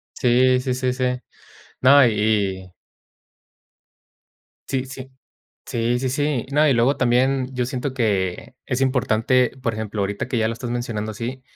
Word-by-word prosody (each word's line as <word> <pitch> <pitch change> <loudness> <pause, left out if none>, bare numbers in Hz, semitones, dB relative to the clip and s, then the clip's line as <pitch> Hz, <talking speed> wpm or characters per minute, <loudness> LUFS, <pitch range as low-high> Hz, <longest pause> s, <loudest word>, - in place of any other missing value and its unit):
Sí, 125 +1 +3
sí, 125 -1 -2
sí, 130 0 -1
sí. 130 0 -2 0.8
No, 140 +1 +7
y 115 - +3 0.5
y 90 - -18 2.0
Sí, 130 -1 -1
sí. 130 0 -9 0.6
Sí, 120 +1 0
sí, 130 0 -1
sí. 145 -2 -1
No, 150 +2 +4
y 140 - +4
luego 125 +4 +2
también 130 +1 +2
yo 125 -1 -1
siento 130 +1 -4
que 105 -1 -1
es 125 0 -2
importante, 125 -1 +2
por 115 -2 -1
ejemplo, 110 -1 -4
ahorita 100 +3 -3
que 125 - -1
ya 110 - +1
lo - - -2
estás 120 +1 -6
mencionando 110 -3 -3
así, 120 +4 -6
125 Hz, 155 wpm, -22 LUFS, 115-130 Hz, 2.0 s, No